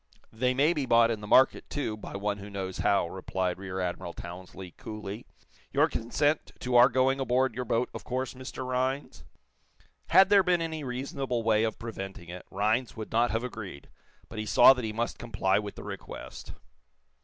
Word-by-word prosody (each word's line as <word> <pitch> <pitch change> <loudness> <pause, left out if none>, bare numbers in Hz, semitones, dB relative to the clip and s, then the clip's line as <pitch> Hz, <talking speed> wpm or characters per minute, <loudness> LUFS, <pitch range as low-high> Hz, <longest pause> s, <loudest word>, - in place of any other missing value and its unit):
"They 125 +3 +1
may 145 +6 +4
be 145 -5 -2
bought 115 -1 +5
in 110 -2 -3
the 105 - -7
market, 130 +5 +4
too, 135 -7 -2
by 105 - -9
one 100 0 -2
who 100 +1 -9
knows 95 -2 -5
how," 100 -4 +2
replied 95 0 -3
Rear 95 -1 -5
Admiral 90 -1 -3
Townsley, 90 +1 -9
coolly. 105 0 -7 0.4
"You - - +4
consent 145 +7 0
to 125 0 -1
our 120 +2 +8
going 130 +2 +2
aboard 130 -1 +1
your 125 +2 -4
boat, 115 +2 +1
of - - -7
course, 130 0 -3
Mr. 130 0 -7
Rhinds?" 130 +2 -2 0.8
Had 190 +2 +6
there 200 -1 +7
been 180 -1 +2
any 160 -2 -3
reasonable 130 -1 -3
way 110 -1 +3
of 110 - -1
preventing 95 -6 -7
it, 90 +1 -9
Rhinds 110 +6 0
would 110 - -6
not 120 +2 +3
have 115 +2 -1
agreed, 105 - -7 0.4
but 110 - -7
he 110 - -3
saw 130 - +8
that 125 -2 -5
he 110 - -2
must 115 +2 -3
comply 100 -4 +1
with 105 -1 -6
the - - -9
request. - - -8
115 Hz, 190 wpm, -29 LUFS, 100-130 Hz, 0.8 s, our